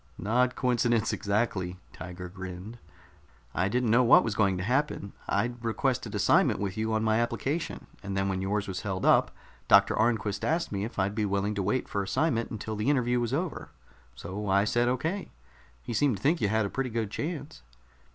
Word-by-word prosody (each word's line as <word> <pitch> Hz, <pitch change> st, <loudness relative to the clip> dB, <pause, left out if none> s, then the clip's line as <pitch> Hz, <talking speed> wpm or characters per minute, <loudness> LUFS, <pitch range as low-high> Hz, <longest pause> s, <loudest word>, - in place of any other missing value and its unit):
"Not 125 Hz, +4 st, +1 dB
coincidence, 120 Hz, -3 st, +1 dB
exactly." 100 Hz, -3 st, -1 dB, 0.2 s
Tiger 90 Hz, +1 st, -7 dB
grinned. 95 Hz, +4 st, -8 dB, 0.7 s
"I 95 Hz, -, +1 dB
didn't 120 Hz, 0 st, +1 dB
know 125 Hz, +3 st, +5 dB
what 120 Hz, -, +7 dB
was 115 Hz, -, -1 dB
going 100 Hz, -3 st, +2 dB
to 90 Hz, -, -3 dB
happen. 125 Hz, -3 st, -1 dB, 0.2 s
I'd 120 Hz, +4 st, -1 dB
requested 120 Hz, +3 st, -1 dB
assignment -, -, +3 dB
with 100 Hz, -2 st, -2 dB
you 110 Hz, +1 st, -1 dB
on 110 Hz, 0 st, +1 dB
my 110 Hz, 0 st, +2 dB
application, 140 Hz, +7 st, -2 dB, 0.2 s
and 100 Hz, -1 st, -4 dB
then 95 Hz, 0 st, +1 dB
when 95 Hz, -1 st, -1 dB
yours 100 Hz, +2 st, -1 dB
was 95 Hz, -1 st, -4 dB
held 95 Hz, -3 st, -3 dB
up, -, -, +5 dB, 0.4 s
Doctor 100 Hz, 0 st, +6 dB
Arnquist 110 Hz, -3 st, 0 dB
asked 170 Hz, +2 st, 0 dB
me 100 Hz, 0 st, -2 dB
if 115 Hz, -, -8 dB
I'd 95 Hz, +1 st, +1 dB
be 105 Hz, 0 st, 0 dB
willing 100 Hz, +1 st, 0 dB
to 100 Hz, -, -2 dB
wait 105 Hz, +7 st, 0 dB
for 100 Hz, -, -2 dB
assignment 115 Hz, +5 st, 0 dB
until 110 Hz, 0 st, -5 dB
the 105 Hz, +6 st, 0 dB
interview 125 Hz, -3 st, +2 dB
was 120 Hz, -1 st, -1 dB
over. 165 Hz, +5 st, -3 dB, 0.5 s
So 95 Hz, +8 st, -5 dB
I 100 Hz, +1 st, +4 dB
said 120 Hz, +3 st, +1 dB
okay. 160 Hz, +11 st, -1 dB, 0.5 s
He 120 Hz, -, -5 dB
seemed 120 Hz, 0 st, +2 dB
to -, -, -15 dB
think 155 Hz, +3 st, +2 dB
you 105 Hz, -, +3 dB
had 110 Hz, +1 st, +1 dB
a -, -, -2 dB
pretty 135 Hz, -1 st, -2 dB
good 110 Hz, -3 st, -2 dB
chance." 150 Hz, 0 st, -5 dB
110 Hz, 195 wpm, -28 LUFS, 100-125 Hz, 0.7 s, what